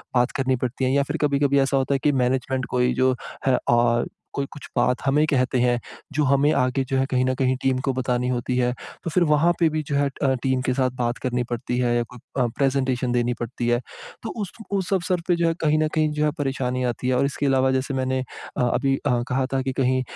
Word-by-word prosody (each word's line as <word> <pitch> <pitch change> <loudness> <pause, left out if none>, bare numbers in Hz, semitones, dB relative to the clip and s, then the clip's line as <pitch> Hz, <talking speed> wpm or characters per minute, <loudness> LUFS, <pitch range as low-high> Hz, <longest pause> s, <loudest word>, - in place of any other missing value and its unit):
बात 120 0 +3
करनी 130 -1 +1
पड़ती 125 +1 -2
है 130 - +1
या 140 +1 +3
फिर 145 +3 -3
कभी-कभी 140 -1 +2
ऐसा 135 0 +2
होता 135 +1 +1
है - - 0
कि 150 - +4
मैनेज़मेंट 130 0 0
कोई 125 0 +2
जो 130 0 +2 0.3
है 130 -2 +4
औ 120 0 +3 0.3
कोई 140 - -1
कुछ 145 - -10
बात 125 - +2
हमें 145 +3 +3
कहते 130 -3 +1
हैं 120 0 +2 0.3
जो 150 +1 +1
हमें 140 +2 +3
आगे 130 +1 +1
जो 135 - +1
है 130 - +2
कहीं 130 -1 +2
न 130 - +1
कहीं 130 0 +1
टीम 135 -1 +1
को 135 - +2
बतानी 125 -1 -1
होती 125 0 -1
है। 125 -1 +2 0.3
तो 170 - -2
फिर 175 +3 +2
वहाँ 155 +4 +4
पे 170 - +4
भी 155 0 -1
जो 140 - -1
है 140 0 +3 0.2
अ, 135 -1 +3
टीम 130 -1 +1
के 130 - +1
साथ 130 0 +1
बात 120 0 0
करनी 125 -1 0
पड़ती 120 0 -2
है 120 -1 +2
या 120 - +2
कोई 125 +1 -13 0.2
अ, - - +2
प्रेज़ेंटेशन 130 -2 +1
देनी 120 0 +1
पड़ती 120 0 -3
है। 120 0 +3 0.4
तो 225 - -4
उस 200 - -4 0.2
उस 195 -1 -1
अवसर 180 -1 0
पे 175 - +3
जो 170 0 +1
है 165 - +2
कहीं 155 -1 +3
न 155 - +2
कहीं 155 -1 +2
जो 150 0 +1
है 150 - +2
परेशानी 130 -2 -1
आती 125 0 -2
है 130 - +2
और 135 - +3
इसके 140 +1 -2
अलावा 130 -1 +3
जैसे 130 +1 -1
मैंने 130 0 0
अ, 130 - -7
अभी 135 +2 +1
अ, 120 -1 +2
कहा 130 +1 +1
था 135 - +1
कि 130 0 -2
कहीं 130 0 +2
130 Hz, 250 wpm, -23 LUFS, 125-140 Hz, 0.4 s, कि